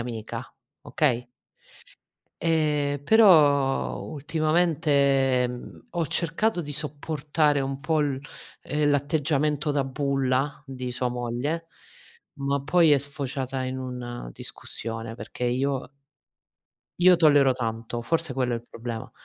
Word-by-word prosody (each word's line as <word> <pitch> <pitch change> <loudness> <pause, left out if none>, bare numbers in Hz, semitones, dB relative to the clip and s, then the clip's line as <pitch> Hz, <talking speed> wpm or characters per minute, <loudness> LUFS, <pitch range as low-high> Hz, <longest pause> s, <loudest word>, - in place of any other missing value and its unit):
amica, 115 0 -5 0.4
okay. 125 -6 0 1.2
Ehm, 150 -3 +1
però, 145 -10 +5
ultimamente 140 -5 +1
ho 170 -3 -1
cercato 175 +6 0
di 145 -1 -6
sopportare 150 0 0
un 135 0 -3
po' 155 +1 +1
l 140 -3 0 0.4
ehm, 150 0 0
l'atteggiamento 150 +1 +1
da 140 -1 +1
bulla 135 0 -1
di 130 -3 -6
sua 125 +1 -1
moglie, 125 +7 -3 0.7
ma 140 0 -1
poi 165 +1 +4
è 145 - +5
sfociata 135 -2 -2
in 130 0 -3
una 125 - -6
discussione 115 - -6
perché 125 - -6
io 130 +2 -1 1.1
io 180 0 +6
tollero 145 -5 +5
tanto, 115 -1 -4
forse 160 +3 0
quello 125 -2 0
è - - 0
il 115 +1 -10
problema, 115 -1 -6
140 Hz, 110 wpm, -25 LUFS, 125-150 Hz, 1.2 s, io